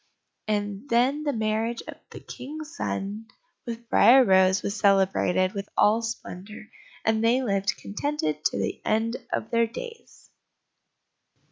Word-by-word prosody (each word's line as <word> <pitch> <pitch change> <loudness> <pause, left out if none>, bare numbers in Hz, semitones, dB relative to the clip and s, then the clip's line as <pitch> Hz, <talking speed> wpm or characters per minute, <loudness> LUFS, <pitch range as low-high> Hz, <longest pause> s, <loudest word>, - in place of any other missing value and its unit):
And 205 +3 -2
then 255 +5 +2
the 300 -1 0
marriage 220 0 -1
of - - -7
the - - -10
King's 305 +5 -8
son 205 -5 -4 0.4
with 235 0 -6
Briar 260 +3 +7
rose 190 -1 +4
was 200 - -2
celebrated 190 -2 +2
with 200 0 -5
all 220 +2 +4
splendour, 215 -2 -7 0.4
and 220 0 +2
they 245 +3 +3
lived 195 -3 0
contented 200 - -3
to - - +1
the - - -3
end 225 +3 0
of - - -3
their 230 -1 +3
days. 460 - -10
220 Hz, 135 wpm, -26 LUFS, 200-245 Hz, 0.4 s, Briar